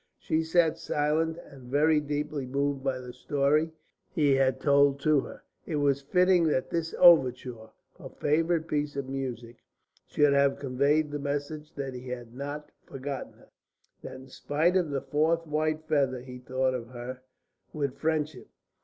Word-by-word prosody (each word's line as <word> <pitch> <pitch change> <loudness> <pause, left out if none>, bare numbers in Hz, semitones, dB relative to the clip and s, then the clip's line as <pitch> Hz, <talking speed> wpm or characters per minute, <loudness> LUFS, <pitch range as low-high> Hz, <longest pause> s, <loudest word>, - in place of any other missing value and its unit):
She 160 - 0
sat 160 -1 +2
silent 155 +2 0
and 130 -3 -14
very 150 +3 +3
deeply 145 -2 -3
moved 140 +1 -1
by 135 -1 0
the 125 -1 -9
story 145 +5 +1 0.4
he 150 -5 +2
had 130 -1 +2
told 140 0 +4
to 155 -1 +4
her. - - -8 0.2
It 160 - -2
was 140 -2 +2
fitting 180 +3 +3
that 130 -4 0
this 165 -1 -2
overture, 125 -9 +4 0.3
her - - -9
favourite 160 +2 0
piece 150 -2 -2
of 140 -2 -3
music, 125 -3 -5 0.5
should 145 -1 +3 0.2
convey 140 +3 +2
the 145 -1 -6
message 145 +2 -4
that 135 -2 -4
he 125 +1 -8
had 120 -2 -7
not 145 +3 -6
forgotten 135 0 -6
her, - - -22 0.5
that - - -8
in 130 +1 -11
spite 155 +7 0
of 180 -4 +2
the 140 -2 -2
fourth 160 +3 +1
white 155 0 -1
feather 135 -5 +1
he 125 0 -10
thought 130 +1 -1
of 120 -2 -4
her 125 +1 -8 0.5
with 140 -4 -3
friendship. 155 -4 -1
145 Hz, 160 wpm, -28 LUFS, 130-155 Hz, 0.5 s, told